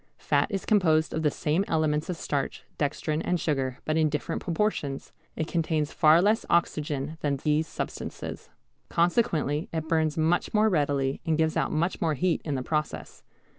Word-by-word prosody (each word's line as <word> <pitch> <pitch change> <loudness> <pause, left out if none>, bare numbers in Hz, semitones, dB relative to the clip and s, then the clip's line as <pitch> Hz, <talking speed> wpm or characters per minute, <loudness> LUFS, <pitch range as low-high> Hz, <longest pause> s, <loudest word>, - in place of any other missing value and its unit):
Fat - - +1
is 195 -3 -3
composed 160 -7 +3
of 160 - -1
the 150 - +3
same 155 +5 0
elements 155 -1 0
as 180 - -2
starch, 140 -3 -3 0.2
dextrin, 150 +1 -1
and 180 +1 0
sugar, 135 -5 -1
but 155 +1 0
in 155 -1 +3
different 150 0 -3
proportions. 165 -6 -2 0.2
It 160 - -1
contains 160 -3 -1
far 160 +2 +5
less 215 +3 +3
oxygen 155 -2 0
than 140 -2 0
these 150 +3 +1
substances. - - -6 0.4
Consequently 170 - +1
it 160 -1 -3
burns 160 -1 +1
much 165 +6 +1
more 215 +1 +4
readily 140 -6 0
and 160 -1 +1
gives 160 -1 +1
out - - 0
much 170 +4 -1
more 160 -3 +1
heat 170 +5 +1
in 145 -3 -2
the 130 - -2
process. 155 +2 -3
155 Hz, 170 wpm, -27 LUFS, 150-170 Hz, 0.4 s, far